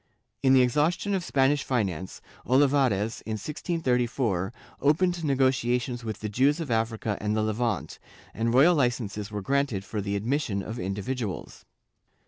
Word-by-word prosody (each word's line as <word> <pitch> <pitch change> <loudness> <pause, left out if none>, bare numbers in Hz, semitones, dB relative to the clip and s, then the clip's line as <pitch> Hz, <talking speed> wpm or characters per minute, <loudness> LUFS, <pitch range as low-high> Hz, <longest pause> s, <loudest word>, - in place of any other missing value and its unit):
In 130 -1 +4
the 130 -1 +6
exhaustion 155 - +1
of 190 -2 0
Spanish 140 -1 +2
finance, 95 -8 -2 0.2
Olivares, 130 -6 +2
in 110 - -4
1634, 125 - -1 0.3
opened 170 +4 +2
negotiations 125 -3 +1
with 110 -2 -5
the 110 - -2
Jews 135 +9 +2
of 155 -7 -4
Africa 110 -2 -1
and 105 0 0
the 110 - +1
Levant, 110 -1 -2 0.3
and 115 +1 0
royal 140 +9 +6
licences 120 - -1
were 105 -2 -5
granted 135 -6 0
for 105 +1 -3
the 100 0 -2
admission 110 -2 -1
of 110 +4 -6
individuals. 100 +3 -4
120 Hz, 140 wpm, -27 LUFS, 105-140 Hz, 0.3 s, the